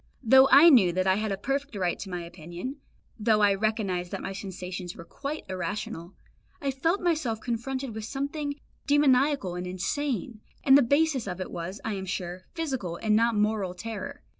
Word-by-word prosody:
Though 265 +3 +7
I 300 +5 +9
knew 205 -10 +6
that 185 +1 0
I 190 0 +3
had 215 -1 -1
a 195 - -1
perfect 275 +3 -2
right 180 -3 -1
to 195 - -6
my 180 -1 -4
opinion, 175 - -7 0.4
though 215 0 +3
I 205 -1 +5
recognised 195 -4 -1
that - - -5
my 195 - -4
sensations 185 -2 -6
were 170 - -10
quite 285 - -6
irrational, 180 -1 -5 0.4
I 280 -4 -1
felt 325 +9 0
myself 305 -11 0
confronted 255 +2 -3
with 220 0 -5
something 285 +3 -3 0.3
demoniacal 280 -7 +3
and 180 +1 -4
insane, 235 +5 -3 0.2
and 270 - +7
the 285 - +8
basis 280 -1 +2
of 180 -1 -4
it 185 - -5
was, 180 +4 -5
I 220 - -1
am 190 -1 -5
sure, 180 0 -4
physical 265 - -3
and 210 +4 +1
not 230 +1 +3
moral 210 -3 0
terror. 230 +8 -6
215 Hz, 185 wpm, -27 LUFS, 185-275 Hz, 0.4 s, I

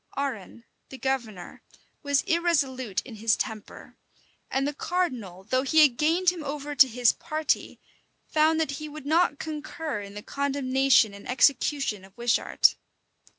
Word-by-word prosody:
Arran, 240 -5 -4 0.3
the 265 - -9
governor, 235 -9 -4 0.4
was 285 -1 +1
irresolute 275 - 0
in 235 -4 -11
his 220 +1 +2
temper; 215 -2 -7 0.5
and 270 +1 0
the 295 - -2
cardinal, 255 - -3
though 255 +6 0
he 310 +4 +5
had 275 -5 +4
gained 335 +6 +2
him 345 -3 -8
over 290 0 -5
to 265 -1 +6
his 245 0 +3
party, 310 -1 -2 0.5
found 315 +1 +2
that 315 -3 0
he 305 - -6
would 300 -1 -10
not 315 0 +2
concur 310 -4 -5
in 200 0 -10
the 210 - -8
condemnation 270 -5 +2
and 200 - -11
execution 270 -4 +1
of 195 +2 -18
Wishart. 240 0 +3
275 Hz, 150 wpm, -26 LUFS, 235-305 Hz, 0.5 s, to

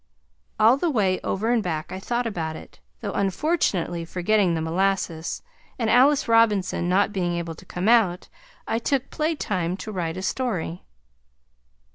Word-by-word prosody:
All 225 +4 +6
the 340 +4 0
way 195 -9 +1
over 220 +4 -1
and 240 -2 +3
back 160 -4 -3
I 185 - -5
thought 240 +5 -2
about 165 -8 -3
it, - - -12 0.2
though 205 -3 -3
unfortunately 195 - 0
forgetting 180 +1 +1
the 160 - -2
molasses, 170 -1 -1 0.3
and 225 -3 0
Alice 275 +4 +4
Robinson 210 -6 +3
not 200 +3 +2
being 175 -3 -1
able 170 -1 -3
to 165 - -15
come 180 +3 -3
out, 215 -6 +3 0.4
I 225 - 0
took 270 +2 -1
playtime 205 - -1
to 215 - -7
write 170 -3 -3
a 185 - -5
story. 190 -7 -2
195 Hz, 155 wpm, -24 LUFS, 175-230 Hz, 0.4 s, All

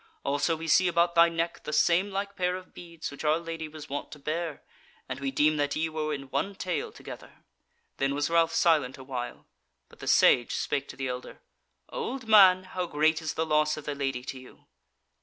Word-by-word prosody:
Also 145 +4 +1
we 165 +1 -7
see 185 +3 +5
about 170 0 +2
thy 170 0 +6
neck 170 0 -2
the - - -5
same 170 +5 +3
like 200 0 -4
pair 180 0 0
of 185 0 -10
beads 170 -3 -8
which 140 - -9
our 155 +1 +3
Lady 165 -1 -5
was 155 0 -10
wont 145 0 -5
to - - -9
bear, 155 +2 -4 0.4
and 130 0 -5
we 135 -1 -2
deem 150 +3 +2
that 145 0 0
ye 160 +1 0
were 155 -1 -3
in 140 -2 -3
one 200 0 -1
tale 180 -3 -3
together." - - -12 0.5
Then 135 +1 0
was 145 0 0
Ralph 165 -1 +3
silent 150 -7 +2
awhile, 130 -2 -6 0.4
but - - -19
the - - -8
Sage 120 - +4
spake 140 -1 -2
to - - -9
the 135 0 -3
elder: 125 0 -6 0.5
"Old 270 - -5
man, 190 -4 +7
how 185 -1 -4
great 155 +1 +2
is 160 - -4
the 160 - 0
loss 150 -1 +2
of 155 - -8
the 150 - -2
Lady 135 -3 -3
to 130 0 -6
you?" 130 - -16
155 Hz, 210 wpm, -28 LUFS, 140-170 Hz, 0.5 s, man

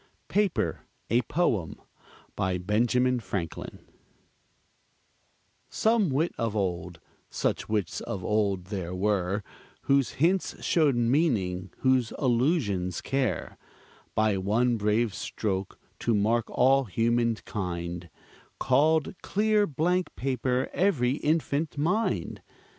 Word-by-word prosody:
PAPER: 205 -3 0 0.3
A 120 +2 +4
POEM 115 - -1 0.6
BY 95 -1 0
BENJAMIN 120 +6 +1
FRANKLIN 90 -7 -5 1.8
Some 220 -4 +2
wit 150 +6 0
of 115 -2 -1
old, 90 -4 -2 0.3
such - - -2
wits 105 -5 -1
of 95 -3 -5
old 100 -4 +1
there 90 -2 -3
were, 100 0 0 0.4
Whose 135 -3 +2
hints 175 +6 0
showed 150 -6 +3
meaning, 115 - +1
whose 130 -3 +2
allusions 120 - +1
care, 130 -9 -2 0.6
By 110 -2 +2
one 115 +6 +2
brave 105 +1 +1
stroke 95 -3 -3 0.2
to 115 - +1
mark 110 +3 +2
all 135 +2 +3
human 115 +3 +1
kind, 85 -5 -5 0.5
Called 150 +4 +3
clear 210 0 +2
blank 175 +5 0
paper 130 0 -1
every 140 -9 +2
infant 155 -1 0
mind! 155 - 0
120 Hz, 105 wpm, -27 LUFS, 100-140 Hz, 1.8 s, A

